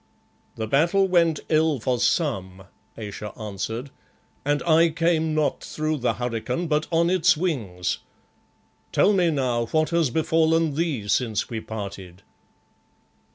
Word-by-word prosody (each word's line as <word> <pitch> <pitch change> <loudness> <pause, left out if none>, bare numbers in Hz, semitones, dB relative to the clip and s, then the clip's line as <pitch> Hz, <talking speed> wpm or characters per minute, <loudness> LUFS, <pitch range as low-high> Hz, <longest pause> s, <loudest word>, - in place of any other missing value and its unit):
"The 110 - -3
battle 170 - +3
went 170 -4 +2
ill 155 -3 +2
for 125 +2 -1
some," 95 - 0 0.3
Ayesha 105 -1 -7
answered, 110 +5 -5 0.5
"and 145 +1 0
I 165 0 +4
came 160 -1 +1
not 150 -3 0
through 155 0 -2
the 125 -2 0
hurricane, 125 +6 -2
but 155 0 0
on 170 +1 +2
its 185 -4 +4
wings. 110 - -2 0.9
Tell 210 - +4
me 180 -3 +3
now, 125 -6 0
what 155 +4 +1
has 170 -4 +2
befallen 160 +1 +2
thee 145 -9 -2
since 110 0 0
we 115 - -2
parted?" 100 -4 -8
150 Hz, 130 wpm, -24 LUFS, 115-165 Hz, 0.9 s, I